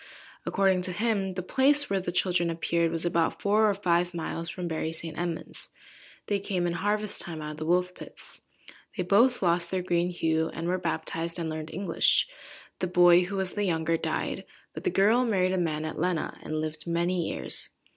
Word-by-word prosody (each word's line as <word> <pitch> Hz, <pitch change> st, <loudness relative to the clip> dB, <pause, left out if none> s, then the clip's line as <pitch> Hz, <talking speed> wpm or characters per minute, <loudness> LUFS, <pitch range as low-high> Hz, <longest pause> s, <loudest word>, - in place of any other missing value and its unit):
According 190 Hz, -2 st, +2 dB
to 180 Hz, 0 st, -3 dB
him, 200 Hz, -2 st, 0 dB
the 185 Hz, -, -3 dB
place 285 Hz, +8 st, +3 dB
where 195 Hz, -1 st, 0 dB
the 180 Hz, -1 st, -3 dB
children 175 Hz, -1 st, +1 dB
appeared, 170 Hz, 0 st, 0 dB
was 165 Hz, +1 st, -3 dB
about 170 Hz, -1 st, +1 dB
four 215 Hz, +2 st, +3 dB
or 200 Hz, -, +1 dB
five 175 Hz, -2 st, +1 dB
miles 165 Hz, 0 st, -4 dB
from 180 Hz, -3 st, -4 dB
Bury–St.–Edmund's. 165 Hz, +1 st, -4 dB, 0.6 s
They 205 Hz, -1 st, 0 dB
came 185 Hz, -2 st, -1 dB
in 170 Hz, -, 0 dB
harvest–time 205 Hz, -3 st, -1 dB
out 150 Hz, 0 st, -5 dB
of 150 Hz, -, -9 dB
the 155 Hz, 0 st, -4 dB
Wolf–pits. 180 Hz, +1 st, -2 dB, 0.6 s
They 180 Hz, -, 0 dB
both 220 Hz, +6 st, +4 dB
lost 170 Hz, 0 st, +2 dB
their 185 Hz, -1 st, -1 dB
green 175 Hz, -1 st, +1 dB
hue, 160 Hz, -2 st, 0 dB
and 165 Hz, +1 st, -3 dB
were 185 Hz, +1 st, 0 dB
baptized, 165 Hz, 0 st, -2 dB
and 165 Hz, -2 st, -2 dB
learned 155 Hz, 0 st, -5 dB
English. 185 Hz, -1 st, +2 dB, 0.5 s
The 185 Hz, -, 0 dB
boy, 175 Hz, 0 st, +6 dB
who 195 Hz, +2 st, -5 dB
was 190 Hz, -1 st, -1 dB
the 205 Hz, -, -1 dB
younger, 165 Hz, -2 st, +1 dB
died, -, -, -2 dB, 0.3 s
but -, -, -8 dB
the -, -, +3 dB
girl 225 Hz, -, +4 dB
married 190 Hz, -6 st, +1 dB
a -, -, +1 dB
man 155 Hz, -3 st, -1 dB
at 155 Hz, -, -5 dB
Lenna, 175 Hz, -1 st, -1 dB
and 155 Hz, 0 st, -3 dB
lived 155 Hz, +1 st, -4 dB
many 170 Hz, 0 st, 0 dB
years. -, -, -1 dB
175 Hz, 185 wpm, -28 LUFS, 165-190 Hz, 0.6 s, boy